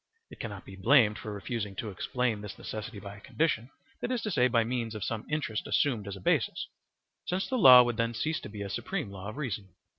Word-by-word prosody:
It - - -12
cannot 105 -4 -6
be 95 - -10
blamed 105 +1 +4
for 110 - -6
refusing 105 -1 -4
to 105 +2 -4
explain 115 +3 -1
this 105 -1 -8
necessity 110 0 -6
by 100 0 -8
a - - -15
condition, 130 -5 0 0.3
that - - -2
is 240 -3 -1
to 215 - -2
say, 125 -7 +4
by 115 -2 +3
means 115 -1 -2
of 105 - -4
some 110 -1 -3
interest 150 -8 -2
assumed 120 -8 +1
as 100 - -4
a - - -9
basis, - - +1 0.6
since 185 +2 -1
the 260 - -1
law 125 - +10
would 120 -2 -2
then 115 0 0
cease 160 +7 -1
to - - -9
be 105 -1 -6
a 100 - -5
supreme 150 - -3
law 95 0 -7
of 110 - -8
reason. 105 - -4
115 Hz, 235 wpm, -30 LUFS, 105-130 Hz, 0.6 s, law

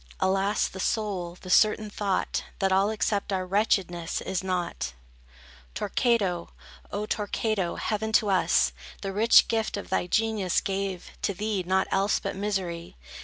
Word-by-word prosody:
Alas, 195 +2 +2
the 190 - -9
sole, 185 -4 -1
the 185 - -9
certain 215 +2 +4
thought, 200 -2 -1
That 195 -1 +1
all 195 +2 +3
except 210 -2 -1
our 185 -1 0
wretchedness, 185 -3 0
is 190 -1 -2
nought. 175 - -2 0.8
Torquato, 200 -5 +1 0.4
O 205 +1 -2
Torquato, 210 -3 -1
heaven 220 0 -2
to 210 -2 +4
us 190 - +3 0.3
The 195 -1 -3
rich 220 +4 +6
gift 225 -2 -1
of 200 - -7
thy - - +1
genius 220 -3 +1
gave, 195 -2 -3
to 200 - -1
thee 210 0 -1
Nought 190 +2 +2
else 195 +2 +2
but 195 - -4
misery. 185 - -3
195 Hz, 145 wpm, -27 LUFS, 185-210 Hz, 0.8 s, rich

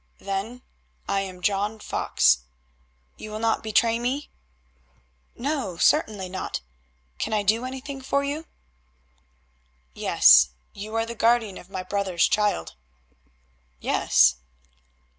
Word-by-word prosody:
"Then 200 +6 -5 0.4
I 200 - +1
am 185 -2 -6
John 205 +2 0
Fox. 65 - +2 0.8
You 215 - -8
will 215 - -5
not 225 0 0
betray 225 +1 +2
me?" 260 +5 -3 1.0
"No; 260 - -3
certainly 210 - +2
not. 185 - -5 0.6
Can - - -2
I 210 -1 +1
do 220 +5 +1
anything 265 +1 -6
for 280 +2 0
you?" 295 +3 -4 1.5
"Yes; 60 +1 +6 0.2
you 215 +2 -7
are 225 0 +1
the 230 - -6
guardian 230 -3 +1
of 180 - -15
my 185 -1 -5
brother's 190 -2 +1
child." 210 - 0 1.1
"Yes." 65 -3 +3
215 Hz, 115 wpm, -25 LUFS, 190-240 Hz, 1.5 s, Yes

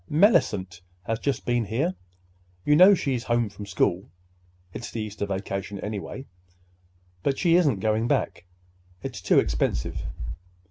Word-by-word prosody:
"Mellicent 105 - +3 0.2
has 115 +2 -2
just 140 -2 -2
been 120 -2 +1
here. 135 - 0 0.7
You 150 - +5
know 185 +5 +8
she's 130 -7 -2
home 120 -2 +1
from 100 0 -9
school. 95 -1 0 0.6
It's 120 - -6
the 115 - -5
Easter 105 -1 -4
vacation, 100 0 -4
anyway, 105 +6 -5 1.0
but 135 +6 0
she 170 -2 +3
isn't 145 - +3
going 110 +2 +1
back. - - -1 0.6
It's - - -5
too - - +3
expensive." - - 0
110 Hz, 135 wpm, -26 LUFS, 100-140 Hz, 1.0 s, know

